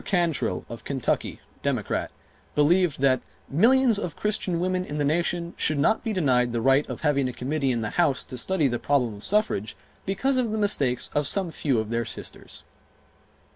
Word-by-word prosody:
Cantrill 165 - 0
of 115 - -9
Kentucky, 135 -4 -2 0.2
Democrat, - - -1 0.5
believed 160 0 +3
that 130 -2 +3 0.3
"millions 235 - +4
of 175 -6 -4
Christian 195 -5 -1
women 185 +1 0
in 150 -4 -6
the 145 - 0
nation 170 +2 0
should 155 - +2
not 215 +10 +2
be 225 - -2
denied 125 - +2
the 120 - 0
right 135 +4 +3
of - - -6
having 140 -4 +1
a - - -6
Committee 135 +2 -1
in 120 -2 -1
the 105 - -3
House 155 -7 +1
to - - -9
study 155 +4 +1
the 120 -2 -2
problem 130 -6 +1
of 100 - -6
suffrage 150 - +1 0.3
because 260 +8 0
of 250 -3 +1
the 220 - -1
mistakes 145 - 0
of 145 -2 +1
some 190 -4 0
few 140 -5 0
of 110 0 -4
their 115 0 0
sisters." - - -8
150 Hz, 185 wpm, -25 LUFS, 130-185 Hz, 0.5 s, millions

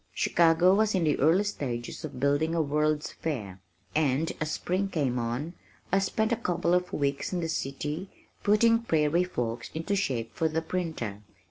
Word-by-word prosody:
Chicago 170 +2 +4
was 215 0 +2
in 180 - +2
the 150 -2 +1
early 165 +7 +4
stages 125 -12 -4
of - - -6
building 145 +4 +1
a 165 - +3
World's 150 +1 0
Fair, 105 - -5 0.3
and 150 0 +1
as 155 - -1
spring 185 +5 -1
came 135 -9 0
on 120 +8 -3 0.4
I 195 - +4
spent 220 +3 0
a - - +4
couple 175 -5 0
of 180 0 +1
weeks 140 -1 -1
in 180 - -1
the 165 - -1
city 150 +4 -3 0.3
putting 230 +3 +4
Prairie 165 -5 +2
Folks 120 -9 -3
into 165 +5 -1
shape 120 - -1
for 160 - +1
the 160 +1 -1
printer. 160 - -3
160 Hz, 170 wpm, -28 LUFS, 140-180 Hz, 0.4 s, Chicago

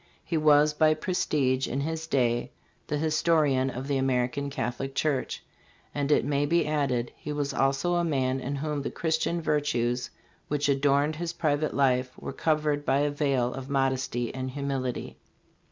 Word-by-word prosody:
He 170 - -2
was 150 -1 +5
by 155 0 +4
prestige 140 -6 0
in 135 - -2
his 160 +2 -3
day 120 -4 +1 0.4
the 150 - -1
histo 155 +2 +2
rian 135 -2 +1
of 130 +2 -5
the 140 -1 +1
American 130 +1 0
Catholic 135 0 -4
Church." 140 -2 -1 0.5
And, 145 0 -1
it - - +4
maybe 145 +4 +2
added, 140 -6 0
he 150 - -7
was 145 -1 -2
also 135 +6 +1
a 175 0 +2
man 135 -5 0
in 135 +2 -3
whom 150 0 -2
the - - -3
Christian 165 +1 -1
virtues 125 -5 0 0.4
which 145 0 0
adorned 140 +2 +2
his 170 0 -3
private 155 -2 0
life 130 -2 +1
were - - -6
covered 150 -2 0
by 140 0 +2
a 145 0 +1
veil 140 -4 0
of 135 0 -7
modesty 130 -3 0
and 130 0 -4
humility. 135 -2 -3
140 Hz, 165 wpm, -27 LUFS, 130-150 Hz, 0.5 s, was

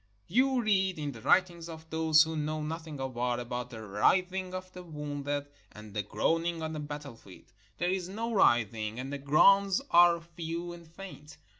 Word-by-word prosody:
You 255 +5 +2
read, 190 -4 +2
in 145 -2 -3
the 115 -4 -11
writings 170 - +2
of 160 0 -10
those 160 0 +5
who 160 0 -4
know 155 0 -2
nothing 160 -1 -6
of 135 -1 -4
war, 120 0 -1
about 120 0 -4
the 110 -3 -9
writhing 185 - +1
of 185 0 -7
the 180 - -8
wounded, 145 -3 -4 0.3
and 105 -1 -12
the 105 - -1
groaning 165 +8 -1
on 160 0 -3
the 155 - -4
battlefield. 145 -9 -9 0.2
There 175 +2 0
is 185 -1 -2
no 230 +4 -3
writhing, 115 - +2
and 135 +2 -5
the 140 - -4
groans 195 +8 +5
are 175 0 +6
few 170 +1 -6
and 170 -1 -13
faint. 165 -3 -11
160 Hz, 180 wpm, -30 LUFS, 140-180 Hz, 0.3 s, are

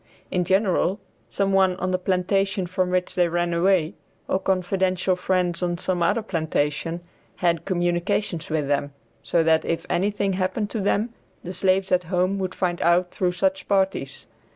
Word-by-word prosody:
In 180 -1 0
general, 190 0 +2 0.3
some 195 -1 0
one 190 -1 +4
on 185 0 -2
the 185 - 0
plantation 195 +1 0
from 185 +1 -1
which 180 0 0
they 175 -1 +3
ran 175 0 0
away, 175 -1 +2 0.3
or 190 - +1
confidential 185 0 0
friends 180 -1 0
on 175 -1 -1
some 180 0 -2
other 205 +7 +2
plantation, 165 -2 -1 0.3
had 170 -2 0
communication 175 0 0
with 155 -3 -1
them, 145 0 -1 0.3
so 170 - +1
that 160 0 +3
if 165 - -2
anything 200 +1 0
happened 190 +3 -1
to 225 - -2
them 210 +3 0 0.3
the 180 - -6
slaves 190 +1 +1
at 180 -1 +2
home 185 +3 0
would 190 -1 -3
find 175 -2 -1
out 175 +1 +3
through 180 -1 0
such 190 +1 0
parties. 190 -9 0
185 Hz, 165 wpm, -24 LUFS, 175-190 Hz, 0.3 s, one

